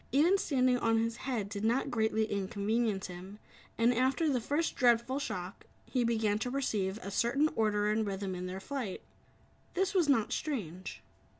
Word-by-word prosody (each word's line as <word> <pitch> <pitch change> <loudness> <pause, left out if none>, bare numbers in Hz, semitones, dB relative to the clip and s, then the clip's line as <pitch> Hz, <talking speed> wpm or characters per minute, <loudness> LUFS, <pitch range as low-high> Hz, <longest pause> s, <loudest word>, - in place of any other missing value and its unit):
Even 310 +9 +5
standing 255 -8 +2
on 225 -1 +2
his 230 +1 0
head 240 -7 -2
did 200 0 -5
not 235 +4 +1
greatly 220 -1 +1
inconvenience 205 +1 -1
him, 185 +3 -9 0.4
and 235 +2 +4
after 260 +6 +2
the 260 -5 +1
first 295 +8 -1
dreadful 240 +2 +3
shock, 185 -9 -5 0.2
he 250 -2 0
began 220 -3 +1
to 245 - -2
perceive 215 -7 -1
a 200 - -5
certain 260 +9 +2
order 210 -2 +2
and 215 0 0
rhythm 195 -1 -3
in 180 0 -4
their 185 +1 -5
flight. 240 -3 -5 0.7
This 385 +2 +1
was 350 -6 +3
not 230 -6 +3
strange. 190 - -4
225 Hz, 170 wpm, -32 LUFS, 200-260 Hz, 0.7 s, Even